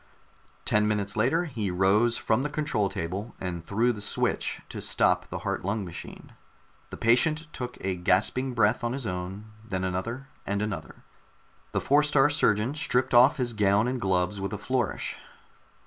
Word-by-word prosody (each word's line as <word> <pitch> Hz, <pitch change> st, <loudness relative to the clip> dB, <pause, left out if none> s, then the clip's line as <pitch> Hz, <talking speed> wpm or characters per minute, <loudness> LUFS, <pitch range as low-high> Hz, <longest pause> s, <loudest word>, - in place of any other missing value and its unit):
Ten 105 Hz, 0 st, +2 dB
minutes 105 Hz, -2 st, -1 dB
later 135 Hz, +11 st, +2 dB
he 115 Hz, -, -3 dB
rose 100 Hz, +6 st, +3 dB
from 110 Hz, +2 st, +1 dB
the 150 Hz, -, -1 dB
control 150 Hz, -9 st, 0 dB
table 95 Hz, +8 st, -5 dB
and 85 Hz, -2 st, -4 dB
threw 115 Hz, +7 st, +1 dB
the 105 Hz, -, -8 dB
switch 100 Hz, -, -1 dB
to -, -, -6 dB
stop -, -, +2 dB
the -, -, -5 dB
heart -, -, -2 dB
lung 100 Hz, +2 st, -1 dB
machine. 85 Hz, -, -10 dB, 0.6 s
The -, -, -8 dB
patient 155 Hz, +8 st, +3 dB
took 125 Hz, 0 st, -6 dB
a 95 Hz, 0 st, -1 dB
gasping 105 Hz, +8 st, +1 dB
breath 115 Hz, 0 st, +2 dB
on 120 Hz, +1 st, -1 dB
his 135 Hz, -2 st, -4 dB
own, 95 Hz, +3 st, -5 dB
then 95 Hz, -4 st, -3 dB
another 110 Hz, +9 st, -3 dB, 0.2 s
and 100 Hz, +1 st, -2 dB
another. 85 Hz, -7 st, -6 dB, 0.7 s
The -, -, -1 dB
Four 145 Hz, +2 st, +4 dB
star 145 Hz, -1 st, +3 dB
Surgeon 115 Hz, -3 st, +2 dB
stripped 130 Hz, -4 st, 0 dB
off 130 Hz, +6 st, +6 dB
his 125 Hz, -3 st, 0 dB
gown 105 Hz, +1 st, +3 dB
and 125 Hz, 0 st, -2 dB
gloves 95 Hz, 0 st, 0 dB
with 100 Hz, -1 st, -3 dB
a -, -, -2 dB
flourish. 130 Hz, -4 st, -2 dB
110 Hz, 170 wpm, -27 LUFS, 95-125 Hz, 0.7 s, off